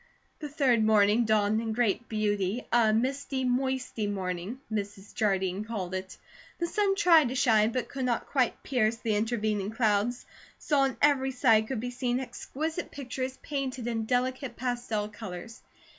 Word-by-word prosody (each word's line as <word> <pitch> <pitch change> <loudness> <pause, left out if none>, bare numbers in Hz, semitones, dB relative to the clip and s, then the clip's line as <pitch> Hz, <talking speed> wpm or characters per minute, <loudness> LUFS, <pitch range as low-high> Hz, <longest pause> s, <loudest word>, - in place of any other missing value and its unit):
The 300 - -5
third 265 -6 +2
morning 215 +1 +4
dawned 215 0 +2
in 225 -1 -2
great 235 0 0
beauty, 210 0 -1
a 230 -2 +5
"misty, 260 +3 -1
moisty 255 -3 -1
morning," 190 +3 -3
Mrs. 205 -1 -5
Jardine 195 -2 0
called 200 -5 -4
it. 190 0 -5 0.4
The 340 - -1
sun 395 +3 +1
tried 340 -7 +6
to 255 - -4
shine 225 -4 +4
but 255 0 -2
could 265 -2 -4
not 240 -2 0
quite 255 -4 0
pierce 235 -4 +1
the 225 -2 -1
intervening 215 -2 0
clouds, 220 +1 0 0.3
so 295 -2 +1
on 270 -1 +1
every 275 -2 +4
side 230 -4 +3
could 260 -2 -3
be 245 +1 -4
seen 245 0 -1
exquisite 305 +6 -4
pictures 260 -1 -5
painted 265 -4 -3
in 225 -2 -2
delicate 255 +2 -1
pastel 240 -4 -2
colours. 210 0 -8
235 Hz, 160 wpm, -28 LUFS, 215-260 Hz, 0.4 s, tried